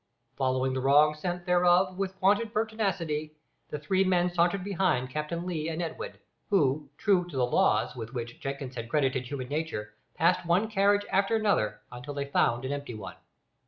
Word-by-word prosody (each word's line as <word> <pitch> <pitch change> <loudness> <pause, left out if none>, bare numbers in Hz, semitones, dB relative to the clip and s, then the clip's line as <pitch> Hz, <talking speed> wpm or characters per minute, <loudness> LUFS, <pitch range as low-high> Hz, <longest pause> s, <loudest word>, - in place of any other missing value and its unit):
Following 130 -1 0
the 130 - -1
wrong 145 +3 +5
scent, 175 +3 -4
therefore, 180 +1 +4
with 190 0 -4
wonted 205 +4 +3
pertinacity, 185 -9 -1 0.3
the - - -3
three 185 +7 +1
men 180 -1 +2
sauntered 175 +2 +2
behind 185 -10 0
Captain 155 +4 -3
Lee 165 -3 -2
and 160 0 -4
Edwin, 440 - -4 0.4
who, 150 -7 +2
true 195 -2 +3
to 155 -6 -7
the 125 - +3
"laws" 110 -2 +2
with 115 -2 -6
which 120 -2 -6
Jenkins 135 -1 -5
had 115 -2 -6
credited 130 -3 0
human 130 -2 -5
nature, 145 -9 -3 0.2
passed 180 +2 +2
one 180 +6 +2
carriage 205 0 +3
after 200 +3 +2
another 200 - +1
until 140 +4 -7
they 140 0 -2
found 125 -3 +1
an 130 - -2
empty 140 -4 -4
one. 105 -3 -8
160 Hz, 175 wpm, -28 LUFS, 130-185 Hz, 0.4 s, wrong